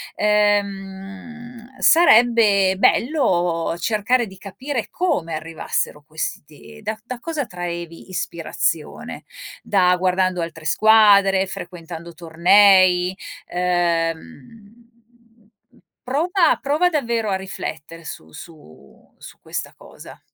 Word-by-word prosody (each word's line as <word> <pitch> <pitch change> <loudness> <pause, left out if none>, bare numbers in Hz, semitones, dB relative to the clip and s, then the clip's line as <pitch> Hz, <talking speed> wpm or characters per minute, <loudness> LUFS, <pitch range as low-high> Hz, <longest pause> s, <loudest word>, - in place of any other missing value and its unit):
Ehm, 205 +4 -2
sarebbe 225 - +5
bello 180 - +1
cercare 225 +5 0
di 190 -1 -13
capire 225 +6 -5
come 295 - -2
arrivassero 155 -2 -4
questi 155 +6 -7
da 215 +1 -4
da 250 0 -7
cosa 315 -4 -3
traevi 170 -3 -7
ispirazione. 475 - -4 0.4
Da 180 -3 +2
guardando 185 0 0
altre 165 -1 -7
squadre, 200 -2 +4
frequentando 170 -2 -9
tornei, 180 +2 +4 0.4
ehm, 175 - -3 1.1
prova 330 +6 +1
prova 300 +5 +1
davvero 235 -9 -1
a 195 - 0
riflettere 165 -4 -7
su 80 - -9
su 80 - -16
su - - -14
questa - - -6
cosa. - - -14
195 Hz, 90 wpm, -21 LUFS, 170-230 Hz, 1.1 s, sarebbe